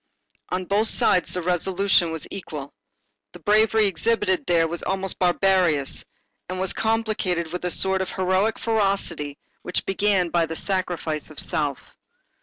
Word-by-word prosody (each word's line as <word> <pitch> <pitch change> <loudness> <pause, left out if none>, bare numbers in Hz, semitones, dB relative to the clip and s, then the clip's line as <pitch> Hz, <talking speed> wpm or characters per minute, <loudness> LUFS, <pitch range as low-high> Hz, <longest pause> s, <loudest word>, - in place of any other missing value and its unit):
On 185 0 -2
both 205 +4 +1
sides, 180 -4 +2
the 180 - -2
resolution 180 0 +2
was 160 -2 -4
equal. 150 -7 -7 0.6
The - - -11
bravery 215 +1 +3
exhibited 200 -1 0
there 165 -2 +3
was 170 +1 -3
almost 190 0 -2
barbarous 180 -5 +2 0.5
and 185 0 -4
was 190 -1 +1
complicated 215 -7 -1
with 180 - -4
a - - +1
sort 190 +2 +1
of 190 - -4
heroic 190 +3 +1
ferocity 195 -9 0 0.2
which 180 - -2
began 195 -2 +1
by 170 -1 +1
the 160 - -5
sacrifice 175 -5 -2
of 155 - -7
self. 145 -3 -1
185 Hz, 145 wpm, -23 LUFS, 170-200 Hz, 0.6 s, bravery